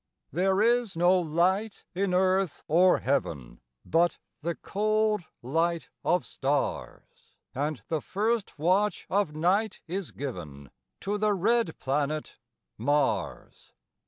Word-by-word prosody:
There 190 +6 +2
is 235 -5 +2
no 180 +2 +5
light 180 +6 0
in 190 +1 0
earth 185 -2 +1
or 180 +3 +4
heaven, 70 - -2 0.2
But 170 +1 +2 0.2
the 170 +2 -2
cold 215 -1 0 0.2
light 165 +6 0
of 180 0 +2
stars; 140 +1 -3 0.2
And 140 -4 -2
the 160 -2 -1
first 215 0 -1
watch 185 +7 +1
of 195 -6 +1
night 190 +6 +1
is 185 +1 -4
given 75 - -7 0.3
To 205 +1 -2
the 210 0 +2
red 220 -1 +1
planet 145 +3 -2 0.4
Mars. 145 +5 -1
175 Hz, 115 wpm, -28 LUFS, 150-200 Hz, 0.4 s, no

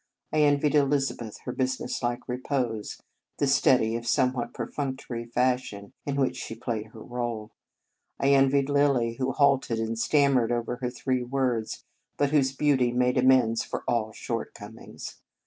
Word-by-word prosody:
I 155 - +2
envied 145 0 +3
Elizabeth 135 -6 +1
her 125 - -2
business 130 +1 -2
like 120 -1 -2
repose, 125 -3 -3 0.3
the - - +1
steady, 130 -4 +3
if 120 0 -5
somewhat 125 -1 +1
perfunctory, 130 -4 -4
fashion 125 -3 -1
in 140 - -1
which 135 -2 0
she 115 - -6
played 115 -2 -4
her 110 0 -12
part. 120 -3 -4 0.7
I 140 - +2
envied 135 0 +4
Lilly, 140 -5 +2
who 130 0 0
halted 135 -3 +2
and 115 0 -2
stammered 135 -4 +3
over 120 0 -2
her 125 -1 -2
three 130 +1 -1
words, 125 -3 -2 0.3
but 145 -1 +1
whose 140 -3 +3
beauty 130 -4 +2
made 125 +1 +1
amends 125 -3 +4
for - - -5
all 110 -2 0
shortcomings. - - -7
125 Hz, 145 wpm, -27 LUFS, 115-135 Hz, 0.7 s, envied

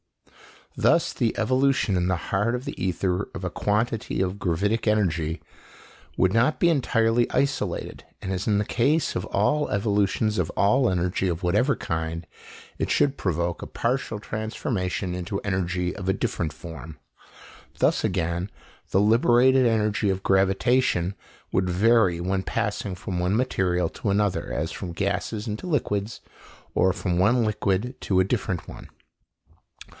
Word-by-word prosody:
Thus - - +3
the 115 - -1
evolution 130 -2 +2
in 90 0 +1
the 95 - +2
heart 100 +7 -1
of 125 - -5
the - - -6
ether 90 0 -1
of - - -6
a - - -1
quantity 110 +2 -1
of 95 +1 -2
gravific 100 +7 0
energy 85 -6 +1 0.8
would 95 0 +3
not 125 +7 +2
be 175 - +4
entirely 120 -6 +2
isolated, 140 0 -2 0.2
and 95 - -4
as 95 +1 -3
in 105 -2 +3
the 105 - 0
case 145 +10 +1
of - - -2
all 150 0 +1
evolutions 105 +1 +1
of - - 0
all 125 +6 +3
energy 90 +1 0
of 85 0 -2
whatever 105 +11 +2
kind, 80 0 -3 0.5
it - - -1
should 140 -1 +2
provoke 85 -2 -1
a - - -6
partial 120 -2 -2
transformation 105 -3 -3
into 90 +2 -3
energy 90 -2 -1
of 95 -2 -6
a - - +3
different 85 -4 -2
form. 80 -2 -9 0.8
Thus - - +2
again 85 +3 -1 0.4
the 95 - +3
liberated 120 +4 +4
energy 105 -2 +1
of 95 0 -1
gravitation 95 0 +2 0.4
would 90 -1 +1
vary 95 -1 +3
when 95 +2 0
passing 105 -4 -2
from 90 0 -4
one 90 +3 +1
material 90 -8 +1
to 105 - -4
another, 100 -1 0
as - - -2
from 90 -2 -6
gases 100 +4 -2
into 110 +10 -4
liquids, 110 - -1 0.5
or 95 - +3
from 90 -3 -1
one 120 +6 +4
liquid 105 +3 -1
to 95 -2 +1
a - - +5
different 95 -4 -2
one. - - -10
100 Hz, 150 wpm, -25 LUFS, 90-115 Hz, 0.8 s, a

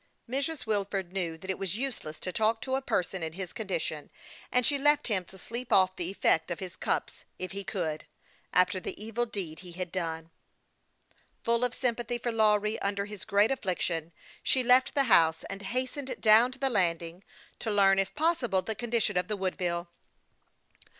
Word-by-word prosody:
Mrs. 275 +3 -2
Wilford 195 -4 -1
knew 170 -4 -2
that 190 +3 -4
it 190 - -5
was 195 +1 -2
useless 235 - -4
to 185 - -2
talk 220 +4 +2
to 260 - -3
a 270 - 0
person 185 -7 -1
in 160 -1 -2
his 185 0 -5
condition, 175 -8 -3 0.4
and 250 -1 +3
she 285 -2 +2
left 295 -1 +3
him 195 -4 +2
to 190 - -12
sleep 235 +6 -6
off 185 -1 +5
the 175 0 -3
effect 160 -4 +2
of 175 - -2
his 180 -3 -6
cups - - -2
if 185 - -5
he 200 0 -5
could, 170 -6 -3 0.4
after 180 +1 +3
the - - -6
evil 225 +3 -2
deed 180 -8 -4
he 180 -2 -10
had 180 -1 -5
done. 165 -2 -3 1.1
Full 235 +1 +2
of 250 0 0
sympathy 240 -1 -1
for 240 0 -2
Lawry, 215 -1 +2
under 200 0 -1
his 210 -2 -8
great 205 +4 +3
affliction, 175 - -1 0.3
she 260 - +2
left 255 +4 +5
the 280 - +4
house, 165 -9 +4
and 195 0 -6
hastened 255 +5 -2
down 225 +3 +6
to - - -12
the 270 0 +1
landing, 170 -3 +1 0.4
to 225 - -3
learn, 195 -2 +4
if 195 0 -1
possible, 260 - +1
the 220 - -2
condi 235 0 0
tion 210 - +1
of 180 - 0
the 210 - -2
Woodville. 180 -2 -2
200 Hz, 190 wpm, -29 LUFS, 180-240 Hz, 1.1 s, down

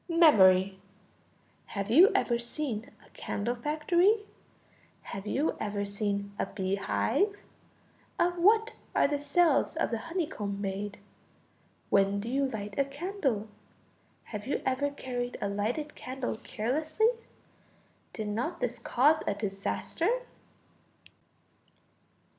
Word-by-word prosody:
Memory. 195 - +6 0.9
Have 200 +1 -4
you 345 - +8
ever 235 -1 +2
seen 235 -1 -4 0.2
a - - -21
candle 220 +4 -3
factory? 345 - +2 0.8
Have 195 +1 -7
you 285 +8 0
ever 205 -1 -2
seen 200 0 -2
a - - 0
bee 190 -1 -2
hive? 395 - +1 0.8
Of 350 0 +1
what 445 +5 +4 0.2
are - - +5
the 290 0 -1
cells 320 0 +2
of 325 - 0
the 230 - -1
honeycomb 295 - -3
made? 200 +1 -3 0.9
When 200 0 +3
do 220 +3 -4
you 275 +2 +1
light 210 -4 -5
a - - +5
candle? 275 - -2 0.8
Have 210 0 -7
you 280 - -1
ever 265 +2 +1
carried 250 -3 -4
a - - -1
lighted 225 +10 -2
candle 255 -3 -4
carelessly? 305 - 0 1.0
Did 215 -2 -4
not 250 +12 -2
this 245 -1 -2
cause 300 +6 +3
a 205 - +1
disaster? 200 -1 -2
245 Hz, 120 wpm, -30 LUFS, 205-310 Hz, 1.0 s, you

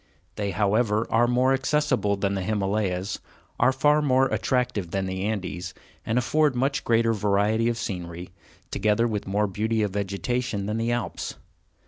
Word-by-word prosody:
They, 100 -1 -2
however, 105 +2 +1
are 120 +2 +4
more 125 +2 +3
accessible 135 -7 +1
than 100 0 0
the 95 - -2
Himalayas, 100 -1 -1 0.4
are 125 +2 +5
far 150 +3 +3
more 135 -2 +3
attractive 120 -8 0
than 95 +2 -1
the 95 +1 -3
Andes, 95 -3 -3 0.3
and 115 +2 -1
afford 150 +2 +2
much 135 +3 0
greater 115 0 +3
variety 105 +2 +2
of 120 - -2
scenery, 90 -4 -5 0.4
together 105 +3 +2
with 105 -4 -3
more 105 +2 +1
beauty 110 +3 0
of 105 - -1
vegetation, 100 +2 -2
than 105 +2 -2
the 115 +1 0
Alps. 120 -7 -3
110 Hz, 155 wpm, -25 LUFS, 100-120 Hz, 0.4 s, are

